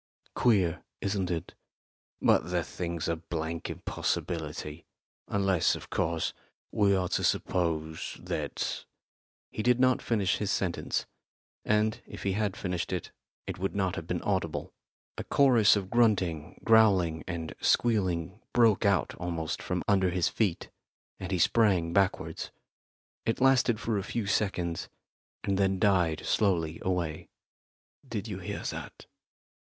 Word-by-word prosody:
Queer, 95 Hz, -9 st, +2 dB, 0.2 s
isn't 95 Hz, -2 st, -1 dB
it?" 85 Hz, -3 st, -3 dB, 0.7 s
"But 85 Hz, -, +3 dB
the 90 Hz, -2 st, 0 dB
thing's 85 Hz, -2 st, -4 dB
a 85 Hz, -, +1 dB
blank 80 Hz, 0 st, -4 dB
impossibility. 75 Hz, -1 st, -3 dB, 0.4 s
Unless, 95 Hz, -4 st, +2 dB
of -, -, -10 dB
course, 80 Hz, -1 st, 0 dB, 0.4 s
we 100 Hz, -2 st, +3 dB
are 90 Hz, -1 st, 0 dB
to -, -, 0 dB
suppose 80 Hz, -3 st, -1 dB
that -, -, -3 dB, 0.3 s
" -, -, -89 dB
He -, -, -3 dB
did 125 Hz, +2 st, +3 dB
not 130 Hz, 0 st, +4 dB
finish 100 Hz, -6 st, +1 dB
his 105 Hz, -, -2 dB
sentence, 90 Hz, -3 st, -1 dB, 0.6 s
and, 105 Hz, +1 st, +1 dB
if -, -, -9 dB
he 100 Hz, -, +1 dB
had 100 Hz, 0 st, -1 dB
finished 90 Hz, -2 st, -3 dB
it, 90 Hz, -3 st, -3 dB, 0.3 s
it -, -, -5 dB
would 95 Hz, +2 st, -2 dB
not 95 Hz, -3 st, 0 dB
have -, -, -6 dB
been -, -, -2 dB
audible. -, -, -2 dB, 0.5 s
A -, -, -2 dB
chorus 120 Hz, -7 st, +5 dB
of 100 Hz, -2 st, -3 dB
grunting, 95 Hz, -10 st, +1 dB
growling 95 Hz, -8 st, +4 dB
and 85 Hz, -3 st, -4 dB
squealing 95 Hz, -4 st, +1 dB
broke 115 Hz, -4 st, +4 dB
out 100 Hz, -2 st, +2 dB
almost 85 Hz, -1 st, -3 dB
from 90 Hz, -1 st, -2 dB
under 95 Hz, -2 st, +3 dB
his 90 Hz, -1 st, +1 dB
feet, 100 Hz, -7 st, -1 dB, 0.5 s
and 95 Hz, 0 st, -5 dB
he 95 Hz, -, +1 dB
sprang 90 Hz, -3 st, +3 dB
backwards. 95 Hz, -1 st, 0 dB, 0.8 s
It 115 Hz, -, +1 dB
lasted 130 Hz, -4 st, +4 dB
for 115 Hz, -3 st, -1 dB
a -, -, -4 dB
few 110 Hz, +1 st, -3 dB
seconds, 95 Hz, -4 st, -1 dB, 0.5 s
and 100 Hz, -1 st, 0 dB
then 95 Hz, -1 st, +2 dB
died 90 Hz, -5 st, +2 dB
slowly 85 Hz, -6 st, +1 dB
away. 85 Hz, -4 st, -2 dB, 0.8 s
"Did 105 Hz, -1 st, -3 dB
you 100 Hz, -4 st, -5 dB
hear 85 Hz, -, -5 dB
that?" -, -, -6 dB
95 Hz, 140 wpm, -29 LUFS, 85-105 Hz, 0.8 s, chorus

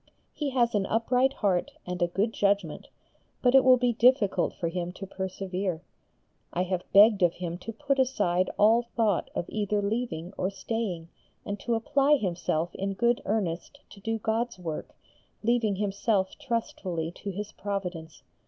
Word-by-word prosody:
He 295 Hz, -2 st, -2 dB
has 245 Hz, -3 st, +2 dB
an 200 Hz, -2 st, +1 dB
upright 250 Hz, +4 st, +2 dB
heart 190 Hz, -8 st, 0 dB
and 180 Hz, 0 st, -4 dB
a 175 Hz, -, +4 dB
good 200 Hz, +6 st, -1 dB
judgement, 200 Hz, 0 st, 0 dB, 0.6 s
but 250 Hz, 0 st, +4 dB
it 270 Hz, -1 st, +7 dB
will 255 Hz, -1 st, +7 dB
be 245 Hz, -1 st, +1 dB
difficult 230 Hz, -6 st, +3 dB
for 170 Hz, -, -2 dB
him 175 Hz, +1 st, -3 dB
to 195 Hz, -, -7 dB
persevere. 190 Hz, -2 st, -4 dB, 0.7 s
I 180 Hz, -, 0 dB
have 185 Hz, -1 st, -3 dB
begged 205 Hz, +1 st, +7 dB
of 175 Hz, -1 st, +4 dB
him 175 Hz, -1 st, -5 dB
to 225 Hz, -, -6 dB
put 275 Hz, +4 st, -1 dB
aside 185 Hz, -9 st, +2 dB
all 220 Hz, +3 st, +5 dB
thought 215 Hz, -6 st, +1 dB
of -, -, -1 dB
either 210 Hz, -1 st, -1 dB
leaving 200 Hz, -5 st, -2 dB
or 185 Hz, -, +1 dB
staying, 195 Hz, -4 st, -4 dB, 0.4 s
and 205 Hz, 0 st, -4 dB
to 235 Hz, +3 st, -1 dB
apply 275 Hz, +5 st, +3 dB
himself 175 Hz, -, -1 dB
in 195 Hz, +1 st, -2 dB
good 235 Hz, +4 st, +1 dB
earnest 205 Hz, -, -2 dB
to 200 Hz, -, -13 dB
do 225 Hz, +3 st, -2 dB
God's 225 Hz, +1 st, -1 dB
work, 165 Hz, -4 st, -6 dB, 0.5 s
leaving 225 Hz, -3 st, +2 dB
himself 200 Hz, 0 st, 0 dB
trustfully 190 Hz, -, -3 dB
to 205 Hz, -, -6 dB
His 205 Hz, +2 st, -5 dB
Providence. 180 Hz, -5 st, -5 dB
205 Hz, 160 wpm, -28 LUFS, 180-235 Hz, 0.7 s, it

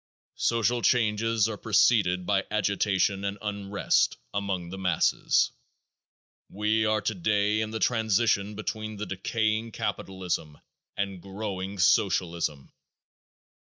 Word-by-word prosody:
Social 115 Hz, +1 st, +1 dB
changes 115 Hz, -2 st, +2 dB
are 110 Hz, -2 st, -4 dB
preceded 100 Hz, -4 st, +3 dB
by 100 Hz, 0 st, +1 dB
agitation 100 Hz, -1 st, +1 dB
and 100 Hz, 0 st, -2 dB
unrest 100 Hz, -1 st, 0 dB, 0.2 s
among 95 Hz, -4 st, -3 dB
the 95 Hz, -, -6 dB
masses. 90 Hz, -4 st, +2 dB, 1.0 s
We 110 Hz, +2 st, +1 dB
are 110 Hz, -1 st, +1 dB
today 105 Hz, +1 st, +1 dB
in 110 Hz, -, -2 dB
the 110 Hz, -, -4 dB
transition 110 Hz, -3 st, +2 dB
period 105 Hz, +1 st, -9 dB
between 110 Hz, 0 st, -4 dB
decaying 110 Hz, +2 st, -1 dB
capitalism 90 Hz, -7 st, -3 dB, 0.4 s
and 100 Hz, -2 st, -3 dB
growing 95 Hz, 0 st, -5 dB
Socialism. 85 Hz, -6 st, +1 dB
100 Hz, 105 wpm, -27 LUFS, 95-110 Hz, 1.0 s, preceded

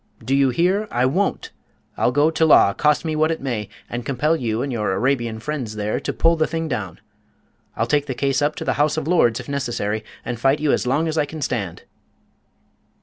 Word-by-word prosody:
Do 130 Hz, -, 0 dB
you 140 Hz, -1 st, +4 dB
hear? 185 Hz, -, +1 dB
I 125 Hz, +1 st, +1 dB
won't! 185 Hz, +10 st, -1 dB, 0.4 s
I'll -, -, +1 dB
go 145 Hz, +4 st, +3 dB
to 160 Hz, -, 0 dB
law, 150 Hz, -10 st, +6 dB
cost 150 Hz, +6 st, +1 dB
me 155 Hz, -1 st, -1 dB
what 155 Hz, +1 st, +2 dB
it 165 Hz, -, -1 dB
may, 120 Hz, -6 st, -3 dB, 0.2 s
and 120 Hz, +1 st, -5 dB
compel 145 Hz, +5 st, +1 dB
you 115 Hz, -5 st, -2 dB
and 140 Hz, -, -3 dB
your 105 Hz, -5 st, -1 dB
Arabian 120 Hz, 0 st, 0 dB
friends 125 Hz, -4 st, -4 dB
there 105 Hz, 0 st, -2 dB
to -, -, -3 dB
pull 165 Hz, +1 st, +3 dB
the 155 Hz, -1 st, +1 dB
thing 165 Hz, 0 st, -3 dB
down. 95 Hz, -, -4 dB, 0.8 s
I'll 115 Hz, -, 0 dB
take 145 Hz, +4 st, +1 dB
the 130 Hz, -, -3 dB
case 135 Hz, +2 st, 0 dB
up 150 Hz, +1 st, +1 dB
to -, -, -6 dB
the -, -, +1 dB
House 150 Hz, +1 st, +2 dB
of 155 Hz, -, -2 dB
Lords, 120 Hz, -10 st, +3 dB
if -, -, -9 dB
necessary, 120 Hz, -6 st, -2 dB, 0.2 s
and 120 Hz, -2 st, -4 dB
fight 135 Hz, +4 st, +2 dB
you 150 Hz, -1 st, +1 dB
as -, -, 0 dB
long 145 Hz, +6 st, +1 dB
as 160 Hz, 0 st, -1 dB
I -, -, +2 dB
can 155 Hz, 0 st, -6 dB
stand!" 100 Hz, -11 st, -3 dB
140 Hz, 220 wpm, -21 LUFS, 120-155 Hz, 0.8 s, law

